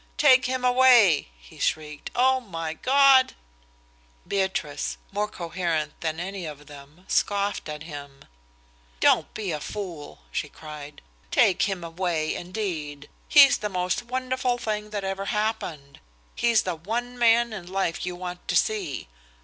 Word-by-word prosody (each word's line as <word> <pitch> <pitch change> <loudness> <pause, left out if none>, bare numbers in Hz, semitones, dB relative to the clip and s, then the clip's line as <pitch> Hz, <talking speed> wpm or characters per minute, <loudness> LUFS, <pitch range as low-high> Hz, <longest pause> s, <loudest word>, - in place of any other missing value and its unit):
"Take 260 -3 +6
him 255 0 -1
away!" 245 - +6
he - - -17
shrieked. 150 -2 -2
"Oh, 260 +1 +4
my 165 -9 -5
God!" 270 - +5 0.9
Beatrice, 190 -7 -2
more 205 +1 -1
coherent 170 -4 -2
than 160 -1 -2
any 185 -1 -5
of 150 -1 -9
them, 145 +4 -14
scoffed 200 -4 0
at 150 0 -6
him. 145 -4 -10 0.7
"Don't - - +3
be 205 -4 -3
a 155 - -2
fool!" 160 - -7
she - - -3
cried. 150 - -10 0.3
"Take 190 +2 +3
him 190 -3 -4
away, 165 -2 -1
indeed! 165 -7 -5 0.2
He's 280 -1 +7
the 210 - -2
most 180 -1 -1
wonderful 255 0 -1
thing 210 -2 -3
that 205 -2 -4
ever 195 +1 -3
happened. 200 -11 -3 0.3
He's 235 -2 +2
the 180 - -2
one 230 +9 -4
man 235 0 +4
in 185 -4 -8
life 190 -3 -1
you 180 0 -3
want 180 0 -7
to 175 - -1
see! 170 - 0
185 Hz, 140 wpm, -25 LUFS, 155-220 Hz, 0.9 s, He's